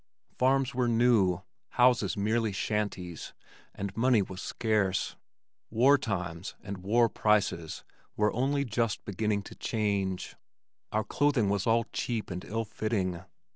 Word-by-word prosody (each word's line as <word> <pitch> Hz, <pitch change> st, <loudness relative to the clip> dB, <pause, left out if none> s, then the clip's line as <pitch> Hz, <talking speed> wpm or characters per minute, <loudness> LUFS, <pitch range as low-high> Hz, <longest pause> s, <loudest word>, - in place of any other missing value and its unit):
Farms 135 Hz, +1 st, +2 dB
were 125 Hz, -1 st, +1 dB
new, 115 Hz, -6 st, +3 dB, 0.3 s
houses 120 Hz, -5 st, +4 dB
were 100 Hz, -, -1 dB
mere 110 Hz, 0 st, +1 dB
shanties, 95 Hz, -5 st, -3 dB, 0.4 s
and 100 Hz, 0 st, -5 dB
money 115 Hz, -2 st, +4 dB
was 95 Hz, 0 st, -8 dB
scarce. 105 Hz, -5 st, 0 dB, 0.5 s
"War 130 Hz, +6 st, +5 dB
times" 90 Hz, -6 st, -4 dB
and 100 Hz, 0 st, -5 dB
"war 115 Hz, +6 st, +3 dB
prices" 100 Hz, -8 st, 0 dB, 0.3 s
were 105 Hz, 0 st, +2 dB
only 140 Hz, +3 st, +1 dB
just 115 Hz, -2 st, -1 dB
beginning 105 Hz, +1 st, -1 dB
to -, -, -10 dB
change. 100 Hz, -4 st, -2 dB, 0.6 s
Our 110 Hz, 0 st, +1 dB
clothing 135 Hz, -2 st, +2 dB
was 100 Hz, +1 st, 0 dB
all 115 Hz, 0 st, +3 dB
cheap 115 Hz, -5 st, -2 dB
and 90 Hz, 0 st, -5 dB
ill 115 Hz, +1 st, -3 dB
fitting. 100 Hz, -5 st, -2 dB
105 Hz, 135 wpm, -29 LUFS, 95-120 Hz, 0.6 s, War